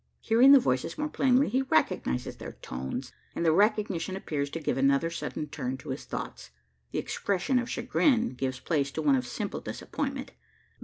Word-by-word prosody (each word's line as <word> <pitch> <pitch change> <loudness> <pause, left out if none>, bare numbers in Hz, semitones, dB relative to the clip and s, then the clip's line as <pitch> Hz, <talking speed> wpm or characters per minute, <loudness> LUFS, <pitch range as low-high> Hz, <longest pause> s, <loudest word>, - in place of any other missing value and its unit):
Hearing 240 +5 +6
the 280 - +10
voices 130 - -1
more 300 0 -1
plainly, 265 -1 +3
he 255 +5 +1
recognises 155 - 0
their - - -8
tones; 65 +1 -6 0.2
and 170 - -1
the 160 - +5
recognition 200 -1 +1
appears 145 -7 -3
to 165 - -5
give 155 - -1
another 140 +4 +2
sudden 165 -2 -4
turn 130 -3 -4
to 145 - -11
his 130 - -4
thoughts. - - -6 0.4
The - - -4
expression 200 +7 0
of 245 - -4
chagrin 245 0 +2
gives 130 0 -3
place 140 -3 0
to 160 - -2
one 140 -2 +5
of 125 -1 -1
simple - - -4
disappointment. - - -4
165 Hz, 175 wpm, -28 LUFS, -, 0.4 s, the